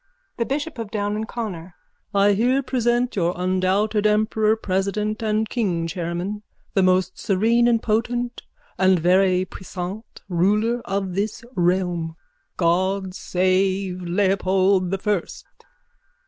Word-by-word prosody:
_ - - -46 0.3
THE 235 - 0
BISHOP 290 0 -3
OF 225 -3 -4
DOWN 205 -1 -2
AND 220 +1 -3
CONNOR: 190 -8 -6 0.4
I 200 +1 +4
here 250 +6 +2
present 245 -1 0
your 175 -2 0
undoubted 190 +4 +1
emperor 215 +1 +2
president 210 +1 -1
and 220 0 0
king 190 -9 -1
chairman, 175 +4 -3 0.3
the 195 - +3
most 185 0 +2
serene 225 +5 +2
and 230 -2 +2
potent 240 +2 -1 0.4
and 190 -1 +5
very 185 +2 +3
puissant 185 +4 -8
ruler 210 +7 +1
of 195 -1 -2
this 210 +5 -2
realm. 175 -2 0 0.4
God 185 +2 +1
save 185 0 0
Leopold 190 0 +2
the 195 - -1
First! 200 -2 -2
195 Hz, 125 wpm, -22 LUFS, 185-220 Hz, 0.4 s, and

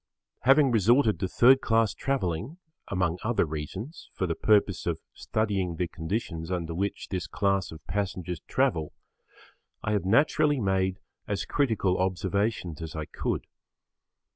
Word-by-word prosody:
Having 135 +1 +5
resorted 115 - +4
to 95 - 0
third 130 +7 +5
class 115 -3 +2
travelling, 125 - -2 0.3
among 90 -2 0
other 115 -4 +2
reasons, 90 - -6
for 95 - 0
the 85 - 0
purpose 100 -1 +2
of 85 -2 0
studying 100 -5 -1
the 90 +1 -1
conditions 80 -1 -4
under 85 -3 -2
which 100 +4 -3
this 90 -2 -3
class 100 -2 0
of 80 -1 -11
passengers 90 -4 -3
travel, 80 -2 0 0.9
I 110 - -1
have 105 -2 +1
naturally 145 +6 +3
made 95 -2 0 0.3
as 100 -1 -2
critical 110 -9 +1
observations 95 -2 -1
as 80 -1 -6
I 80 -1 -3
could. - - -3
95 Hz, 140 wpm, -28 LUFS, 90-110 Hz, 0.9 s, Having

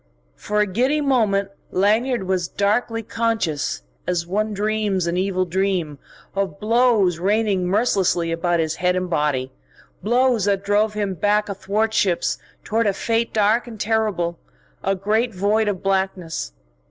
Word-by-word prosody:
For 210 - -1
a - - +3
giddy 255 +10 +1
moment 215 -9 +1 0.2
Lanyard 220 +5 +1
was 185 -2 -1
darkly 225 +4 0
conscious 220 - -1 0.2
as 175 -2 0
one 210 +5 -1
dreams 210 -2 0
an 170 0 -1
evil 185 0 0
dream 180 -5 -1 0.3
of 195 -6 -2
blows 220 -6 +3
raining 200 -1 +1
mercilessly 190 -5 +1
about 170 +1 0
his 160 0 -1
head 180 0 +1
and 185 -1 -2
body, 145 -5 0 0.5
blows 240 -1 +2
that 200 -1 +1
drove 210 +1 +2
him 205 -2 -1
back 210 +4 +1
athwartships 200 -1 0 0.2
toward 225 +1 0
a 200 - +2
fate 230 +3 -1
dark 220 +3 +2
and 225 -3 -9
terrible, 205 -6 0 0.4
a 195 - +1
great 215 +4 0
void 210 +3 +1
of 200 -3 -2
blackness. 190 - -1
200 Hz, 140 wpm, -22 LUFS, 180-220 Hz, 0.5 s, a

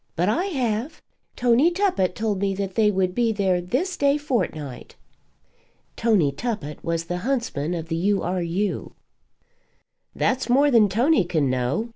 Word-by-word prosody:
"But 175 +4 +1
I 345 - +1
have. 255 - -2 0.4
Tony 245 +6 +4
Tuppett 350 - 0
told 215 -3 -1
me 195 -1 0
that 195 -1 -4
they 215 0 +3
would 185 -2 0
be 230 +2 +1
there 190 -4 +1
this 285 - -2
day 280 0 +2
fortnight." 180 - -3 1.0
Tony 205 -11 +2
Tuppett 180 - -5
was 165 0 -1
the 175 +1 -3
huntsman 210 - -2
of 165 -1 -5
the 165 0 -2
U. 195 +3 +1
R. 180 +1 -1
U. 185 +4 -2 1.2
"That's 260 -1 0
more 280 +4 +4
than 220 -4 +5
Tony 245 - +3
can 155 -6 0
know. 130 - -1
205 Hz, 155 wpm, -23 LUFS, 175-245 Hz, 1.2 s, than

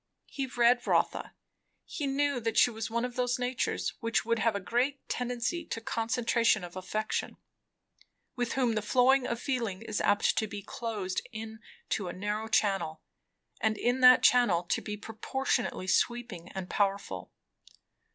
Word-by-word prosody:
He 275 -1 -4
read 245 0 +3
Rotha; - - +1 0.5
he 290 - -4
knew 280 -1 +1
that 225 -1 -2
she 245 - +6
was 220 -1 -4
one 235 +2 0
of 250 -1 -6
those 245 -1 0
natures 250 0 -1
which 230 0 +1 0.2
have 225 -2 +2
a - - 0
great 250 +7 -1
tendency 250 +7 -2
to - - -4
concentration 230 -1 +1
of 175 0 -8
affection; 215 +4 -3 1.0
with 245 -3 -1
whom 250 -4 +1
the 215 - 0
flow 250 +4 +4
of 235 -2 -2
feeling 230 -7 -2
is 215 -2 -2
apt 205 0 +3
to 220 - -1
be 205 -1 -7
closed 205 -4 -3
in 220 0 -7 0.3
to 195 - -1
a 175 - -4
narrow 210 +3 -3
channel, 195 -7 0 0.6
and 215 -1 +1
in 245 +2 +1
that 255 0 +8
channel 220 -9 +5
to 175 - -1
be 210 -1 -5
proportionately 225 -1 -2
sweeping 220 -4 0
and 190 -2 -5
powerful. 200 0 -1
225 Hz, 155 wpm, -30 LUFS, 205-245 Hz, 1.0 s, that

